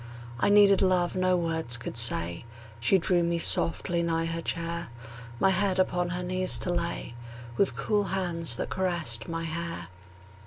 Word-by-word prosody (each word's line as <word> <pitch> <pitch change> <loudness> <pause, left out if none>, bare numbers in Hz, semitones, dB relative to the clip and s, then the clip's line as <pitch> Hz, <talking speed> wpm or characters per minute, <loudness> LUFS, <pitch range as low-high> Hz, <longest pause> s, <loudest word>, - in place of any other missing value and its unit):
I - - +2
needed 205 -1 +6
love 185 -2 +2
no 185 0 +2
words 160 -8 -2
could 120 - -7
say; 85 -8 0 0.4
She 120 +11 +3
drew 180 0 +2
me 170 0 0
softly 170 +1 +2
nigh 165 -1 0
her 165 0 -3
chair, 170 0 -3 0.5
My 195 - +4
head 190 0 +1
upon 180 -1 +1
her 180 +1 -3
knees 185 +1 +1
to 180 - -1
lay, 170 -7 -3 0.4
With 190 -8 +1
cool 205 +10 0
hands 170 -8 -2
that - - -4
caressed 170 -11 0
my 165 0 -3
hair. 165 - -4
170 Hz, 160 wpm, -27 LUFS, 165-185 Hz, 0.5 s, needed